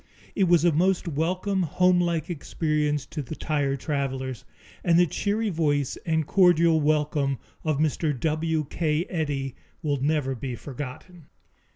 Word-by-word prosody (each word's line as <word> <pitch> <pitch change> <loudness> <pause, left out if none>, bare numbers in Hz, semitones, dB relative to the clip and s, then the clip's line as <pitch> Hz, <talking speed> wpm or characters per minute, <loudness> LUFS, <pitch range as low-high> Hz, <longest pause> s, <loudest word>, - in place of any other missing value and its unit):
It 195 - +2
was 175 -2 +4
a 175 - +5
most 180 +4 +1
welcome, 180 +5 0
homelike 175 -1 +2
experience 150 -3 -1
to 150 - -5
the 145 +3 -7
tired 140 -4 -1
travelers, 135 -4 -3 0.4
and 170 -1 +4
the 175 - +6
cheery 205 +6 -1
voice 145 -5 0
and 160 -1 +1
cordial 170 -3 +4
welcome 150 -2 +1 0.3
of 155 -3 0
Mr. 150 -2 0
W. 155 0 0
K. 155 0 0
Eddy 145 -7 -2 0.3
will 145 -2 +1
never 145 -2 +1
be 130 0 -5
forgotten. 145 +6 -8
155 Hz, 140 wpm, -26 LUFS, 145-170 Hz, 0.4 s, the